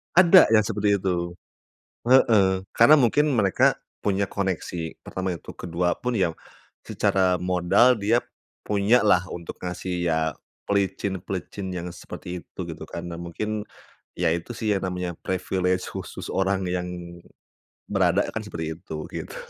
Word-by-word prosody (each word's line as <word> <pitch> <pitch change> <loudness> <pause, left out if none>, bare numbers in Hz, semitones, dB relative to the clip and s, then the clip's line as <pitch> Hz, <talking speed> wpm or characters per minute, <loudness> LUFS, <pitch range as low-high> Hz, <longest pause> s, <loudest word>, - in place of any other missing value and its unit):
Ada 175 - +7
yang 110 - +7
seperti 105 -1 +1
itu, 85 -2 -2 0.6
heeh. 100 -7 +4
Karena 145 +7 +7
mungkin 145 +4 +3
mereka 100 -7 +3 0.2
punya 100 -1 +1
koneksi. 90 -4 -3
Pertama 95 0 -4
itu. - - -11
Ke-2 90 0 -1
pun 125 - -3
ya 85 -4 +1 0.5
secara 95 -2 +1
modal 90 +7 +4
dia 110 +2 +2 0.5
punya 105 +4 +4
lah 90 -3 +5
untuk 85 -1 -7
ngasih 90 0 -3
ya 80 -2 +1 0.5
pelicin-pelicin 95 -1 -2
yang 90 -1 -4
seperti 90 -1 -8
itu - - -23
gitu - - -7
kan, 85 - -6
nah 85 - -6
mungkin 105 +5 -4 0.6
ya - - +2
itu 85 +6 -6
sih 110 -3 +1
yang 95 - -2
namanya 90 -1 -3
privilege 90 0 -1
khusus - - -7
orang 95 0 0
yang 90 0 -2 1.0
berada 95 -1 +2
kan 110 - -3
seperti 80 -5 -5
itu, 85 - -8
gitu. - - -7
95 Hz, 140 wpm, -25 LUFS, 90-105 Hz, 1.0 s, Ada